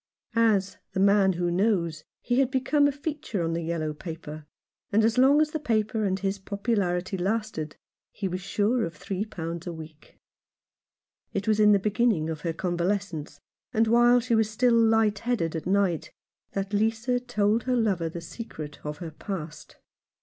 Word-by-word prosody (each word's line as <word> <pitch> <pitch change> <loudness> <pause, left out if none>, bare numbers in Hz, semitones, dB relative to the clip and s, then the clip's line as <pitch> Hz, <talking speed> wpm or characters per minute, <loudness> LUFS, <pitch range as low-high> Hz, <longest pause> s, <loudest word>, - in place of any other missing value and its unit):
As 215 -4 +2
" - - -49
The - - -1
Man 200 -1 +4
who 175 0 -1
Knows" 170 -5 +1 0.2
he 245 +1 +1
had 270 -2 +3
become 285 +2 +2
a - - +1
feature 285 - -4
on 165 0 -1
the 170 - -1
yellow 160 -2 -2
paper, 155 -1 -8 0.4
and 215 +2 +4
as 230 +2 +2
long 275 +3 +6
as 305 0 +2
the 315 - -2
paper 220 -5 0
and 190 -1 +1
his 195 0 -2
popularity 195 -2 -1
lasted 195 -6 -2 0.4
he 200 - -3
was 185 0 -4
sure 210 +5 +1
of 165 -1 -4
three 195 +6 -3
pounds 170 -4 -6
a - - -2
week. 160 -1 -12 1.2
It 200 +1 -2
was 215 -1 +3
in 210 0 +6
the 205 - +6
beginning 205 -5 +1
of 155 -2 -6
her 165 - -1
convalescence, 175 -3 -2 0.3
and 225 +1 +3
while 240 +2 +5
she 240 0 -1
was 220 -1 +3
still 240 +2 +2
light 225 -2 +3
headed 210 -10 -1
at 160 - -4
night, 190 -4 +1 0.4
that 195 +1 -3
Lisa 225 +4 +1
told 225 -2 0
her 255 -1 +1
lover 195 -8 +1
the 170 +1 -7
secret 155 -6 -8
of 150 0 -5
her 170 -3 -7
past. 160 -2 -7
200 Hz, 180 wpm, -27 LUFS, 170-225 Hz, 1.2 s, long